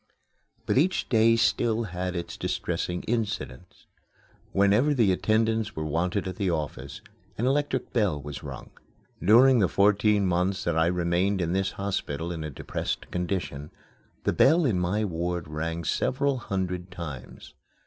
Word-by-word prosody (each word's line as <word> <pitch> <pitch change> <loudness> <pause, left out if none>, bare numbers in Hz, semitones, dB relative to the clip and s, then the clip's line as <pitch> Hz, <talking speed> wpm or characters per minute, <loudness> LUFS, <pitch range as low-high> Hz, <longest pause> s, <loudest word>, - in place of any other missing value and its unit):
But - - +2
each 180 +5 +1
day 115 -1 +5
still 115 0 +1
had 90 -2 -4
its 85 -1 -4
distressing 90 +1 -3
incidents. 110 -3 -4 0.7
Whenever 105 +9 +3
the 115 -7 +4
attendants 110 +3 +1
were 80 - -3
wanted 90 +6 -1
at 90 - -5
the 100 -3 0
office, 75 -4 -4 0.4
an 120 - -1
electric 135 -1 0
bell 105 -11 +1
was 70 0 -7
rung. - - -9 0.5
During 120 +6 +6
the 95 - +4
fourteen 105 +1 +3
months 90 +2 0
that 85 - 0
I 80 0 +3
remained 90 +3 +1
in 85 -1 -1
this 95 0 0
hospital 85 -5 -3
in 80 -2 -4
a 75 - -4
depressed 70 - -4
condition, 75 -5 -3 0.5
the - - +1
bell 165 +3 +4
in 105 -9 +1
my 100 +5 0
ward 85 -2 -3
rang 80 +2 -3
several 135 - 0
hundred 95 -4 -3
times. 75 -8 -8
95 Hz, 150 wpm, -27 LUFS, 85-110 Hz, 0.7 s, During